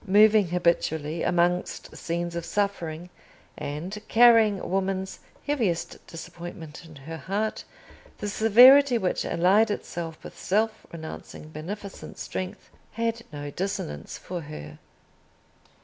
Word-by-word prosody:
Moving 210 0 +6
habitually 165 -2 0
amongst 175 0 0
scenes 170 0 -3
of 170 - -3
suffering, 180 -4 -2 0.4
and 175 +9 -5
carrying 225 -3 +6
woman's 190 0 -2 0.3
heaviest 230 - -1
disappointment 165 -1 -9
in 160 -2 -13
her 155 +4 -8
heart, 205 +6 -2 0.5
the 210 - -4
severity 245 +6 +7
which 185 -5 -1
allied 195 +6 +3
itself 170 -5 -4
with - - -10
self 215 +3 -1
renouncing 160 -1 -9
beneficent 190 +6 -8
strength 185 -1 -6 0.2
had 230 +1 -1
no 145 -1 -6
dissonance 155 - -4
for 175 -1 -6
her. 75 - -9
180 Hz, 110 wpm, -26 LUFS, 165-210 Hz, 0.5 s, severity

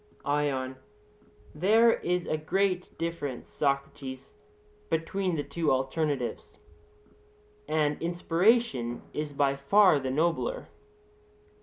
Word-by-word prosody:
ION: 140 -3 -1 0.8
There 220 +8 +5
is 180 0 -1
a - - -1
great 185 +4 -1
difference, 165 -6 -4
Socrates, 140 -2 -3 0.6
between 180 +3 -1
the 145 - -2
two 150 +3 -1
alternatives; 135 0 -2 1.1
and 150 -1 0
inspiration 170 - +1
is 150 -1 -3
by 140 -1 +1
far 180 +4 +5
the 130 -1 -3
nobler. 170 - -1
155 Hz, 95 wpm, -28 LUFS, 140-175 Hz, 1.1 s, There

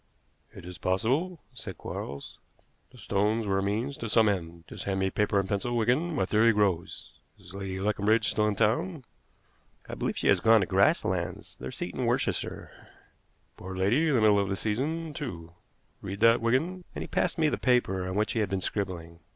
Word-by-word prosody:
"It - - -12
is 90 0 -9
possible," 135 - 0
said 110 -6 -8
Quarles. 70 +1 -7 0.5
"The - - -18
stones 105 +3 0
were 95 -1 +1
a - - 0
means 110 +8 -2
to 115 - -5
some 110 +1 +4
end. 85 -4 -2
Just - - -8
hand 95 -1 -1
me 95 0 0
paper 105 -1 +1
and 100 -1 +1
a - - -14
pencil, 120 +4 -1
Wigan. 130 +9 +1
My 95 - +1
theory 115 +4 +4
grows. 100 -5 -1 0.3
Is 85 - -15
Lady 95 -1 -5
Leconbridge 105 +2 +2
still 105 0 +1
in 105 - 0
town?" 120 - 0 0.8
"I - - -7
believe - - -2
she - - -1
has - - +5
gone 110 -1 +5
to - - +1
Grasslands, 95 - 0
their 65 - -5
seat - - -5
in - - -2
Worcestershire." - - -1 0.9
"Poor 95 +1 -7
lady! 115 +13 +2
The 150 - +2
middle 105 -1 +5
of 100 -1 0
the 95 - 0
season, 150 +11 -2
too. 85 - -6 0.5
Read 100 0 -6
that, 115 0 +5
Wigan," 160 +11 0
and - - -3
he - - -7
passed 180 - 0
me 160 -2 +3
the - - -2
paper 95 -8 +1
on 95 - -4
which 105 +1 +1
he 115 - 0
had 105 -3 0
been 95 0 -1
scribbling. 85 -5 -4
105 Hz, 200 wpm, -28 LUFS, 95-120 Hz, 0.9 s, has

